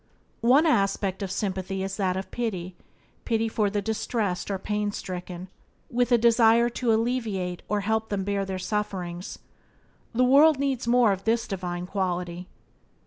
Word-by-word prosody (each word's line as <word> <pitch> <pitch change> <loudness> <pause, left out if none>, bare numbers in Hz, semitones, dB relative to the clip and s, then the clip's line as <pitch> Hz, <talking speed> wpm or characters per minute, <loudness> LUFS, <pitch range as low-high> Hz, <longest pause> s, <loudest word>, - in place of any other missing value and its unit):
One 285 +6 +6
aspect 195 - +1
of 195 - -3
sympathy 190 -1 -2
is 195 0 -4
that 190 -2 0
of 190 - -6
pity 185 -7 -3 0.2
— - - -36
pity 225 -1 0
for 215 -2 0
the 205 0 -2
distressed 215 -3 -2
or 195 - -1
pain 210 +1 -2
stricken, 180 -2 -6 0.4
with 245 0 +1
a 240 - +7
desire 235 0 +5
to 240 0 0
alleviate 220 -6 -1
or 210 -1 +1
help 220 +2 -1
them 200 -2 -1
bear 200 0 -1
their 190 -1 -4
sufferings. 185 -3 -3 0.8
The 250 - +4
world 290 +4 +6
needs 270 -3 -1
more 240 -2 +5
of 195 0 -3
this 230 +1 +1
divine 180 -2 -4
quality. 180 -2 -3
205 Hz, 160 wpm, -26 LUFS, 185-230 Hz, 0.8 s, a